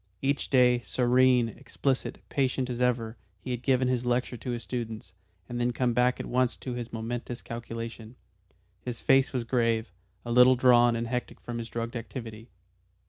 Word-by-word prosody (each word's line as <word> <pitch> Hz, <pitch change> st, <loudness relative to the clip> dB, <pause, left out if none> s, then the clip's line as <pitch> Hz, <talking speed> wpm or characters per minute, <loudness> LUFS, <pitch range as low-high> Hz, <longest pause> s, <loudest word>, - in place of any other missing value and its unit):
Each 140 Hz, +1 st, 0 dB
day, 125 Hz, -2 st, +5 dB
serene, 125 Hz, 0 st, +3 dB
explicit, 130 Hz, +4 st, -3 dB
patient 130 Hz, -2 st, 0 dB
as 120 Hz, 0 st, -4 dB
ever, 120 Hz, -2 st, 0 dB, 0.2 s
he 130 Hz, -, -6 dB
had 120 Hz, -1 st, -3 dB
given 130 Hz, -1 st, +2 dB
his 125 Hz, -1 st, 0 dB
lecture 125 Hz, 0 st, 0 dB
to 125 Hz, -, -7 dB
his 120 Hz, -1 st, -3 dB
students, 110 Hz, -6 st, -5 dB, 0.3 s
and 120 Hz, -, -4 dB
then 120 Hz, -, +2 dB
had 120 Hz, -, -2 dB
come 125 Hz, -2 st, +1 dB
back 125 Hz, +1 st, +2 dB
at -, -, -4 dB
once 125 Hz, 0 st, +1 dB
to 130 Hz, -, -5 dB
this 120 Hz, -1 st, -5 dB
momentous 120 Hz, +1 st, -5 dB
calculation. 115 Hz, 0 st, -7 dB, 0.7 s
His 120 Hz, -2 st, -5 dB
face 135 Hz, -2 st, +4 dB
was 125 Hz, -3 st, -1 dB
grave, 115 Hz, -2 st, 0 dB, 0.3 s
a 120 Hz, -, -4 dB
little 125 Hz, +2 st, +7 dB
drawn 120 Hz, -1 st, +5 dB
and 115 Hz, 0 st, -2 dB
hectic 125 Hz, +1 st, -4 dB
from 120 Hz, -1 st, -6 dB
his 115 Hz, 0 st, -6 dB
drugged 115 Hz, +1 st, -4 dB
activity. 115 Hz, -1 st, -7 dB
120 Hz, 180 wpm, -28 LUFS, 115-125 Hz, 0.7 s, little